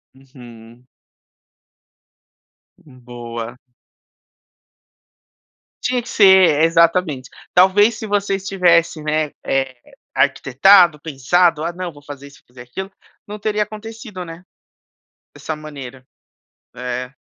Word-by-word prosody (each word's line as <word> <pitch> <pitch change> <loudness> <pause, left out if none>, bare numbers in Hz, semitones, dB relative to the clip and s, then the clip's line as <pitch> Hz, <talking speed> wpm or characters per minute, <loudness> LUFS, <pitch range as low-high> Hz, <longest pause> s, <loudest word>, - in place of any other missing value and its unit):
Uhum. 120 -3 -16 1.9
Hum, 130 -4 -19
boa. 120 -1 -8 2.3
Tinha 250 0 0
que 240 - -15
ser, 190 -8 +5
é, - - +6
exatamente, 165 -5 +1 0.2
talvez 205 +5 +4
se 220 - -7
você 200 -1 0
estivesse 175 -5 +1
né 155 -1 -1
eh, 135 -1 -1 0.4
arquitetado, 170 +4 +4
pensado, 160 +3 +1
"Ah 170 - -3
não 180 -1 -6
vou 145 -2 -17
fazer 145 -1 -10
isso 140 - -18
fazer 125 0 -14
aquilo", 190 +11 -7 0.4
não 210 +1 -7
teria 210 0 -1
acontecido 215 -2 -9
né, 170 +1 -11 0.9
dessa 160 - -6
maneira, 135 -4 -10 0.7
é. 125 +1 -5
160 Hz, 105 wpm, -19 LUFS, 130-190 Hz, 2.3 s, é